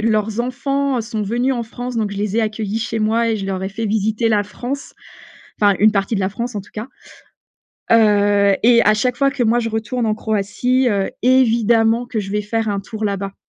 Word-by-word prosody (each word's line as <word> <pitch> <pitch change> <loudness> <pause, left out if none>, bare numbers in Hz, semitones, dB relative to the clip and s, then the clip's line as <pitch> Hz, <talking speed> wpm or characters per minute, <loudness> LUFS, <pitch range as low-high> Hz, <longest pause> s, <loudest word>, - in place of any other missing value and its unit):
leurs 215 0 0
enfants, 275 +2 -1
heu, - - 0
sont 220 -1 -4
venus 240 +6 0
en 240 -2 -2
France 245 +2 -6
donc 215 -2 -1
je 200 - -6
les 205 +1 -2
ai - - +3
accueillis 215 -1 -2
chez 225 0 -3
moi 225 +2 +1
et 220 - 0
je 195 - -5
leur 190 -1 -3
ai 190 - -2
fait 215 +3 -4
visiter 220 +2 0
la 210 -2 +2
France. 250 +7 -6 0.7
Enfin 205 -2 +4
une 215 +2 +5
partie 200 +2 -1
de - - -1
la 190 -1 0
France 235 +3 -5
en 205 - -3
tout 205 - -19
cas. 215 +4 -6 1.1
Heu, 205 -3 +4
et 235 0 +5
à 215 - +4
chaque 245 +3 0
fois 275 +1 +2
que 265 -2 -2
moi 235 +1 +3
je 230 - -2
retourne 225 +2 -2
en 215 - +1
Croatie, 220 +5 0
heu, 200 -2 0
évidemment 235 -2 +3
que 235 -2 -3
je 195 -1 -6
vais 210 +1 -1
faire 225 +1 -2
un 200 -1 -1
tour 215 +2 -6
là 200 -1 0
bas. 195 0 -6
220 Hz, 230 wpm, -19 LUFS, 205-235 Hz, 1.1 s, une